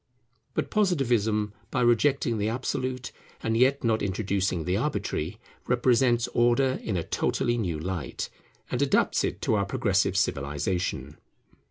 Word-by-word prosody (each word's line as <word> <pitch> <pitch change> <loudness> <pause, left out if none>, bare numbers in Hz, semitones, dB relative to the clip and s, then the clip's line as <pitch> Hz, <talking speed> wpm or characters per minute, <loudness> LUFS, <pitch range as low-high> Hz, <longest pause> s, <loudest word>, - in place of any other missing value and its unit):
But - - -1
Positivism, 120 - +1 0.2
by - - 0
rejecting 120 0 +2
the 105 +1 0
absolute, 130 +1 -3 0.3
and 115 0 0
yet 130 +4 +3
not 110 -2 +2
introducing 95 -3 -1
the 90 - +1
arbitrary, 105 - -2 0.3
represents 120 -1 +3
Order 120 +2 +2
in 100 -5 -2
a 85 - -1
totally 120 +7 0
new 90 -9 -1
light, 90 -1 -4 0.4
and 125 - -1
adapts 140 -1 +2
it - - -3
to - - +1
our 100 -2 +2
progressive 100 -2 +1
civilization. 75 +1 -1
110 Hz, 135 wpm, -27 LUFS, 95-125 Hz, 0.4 s, yet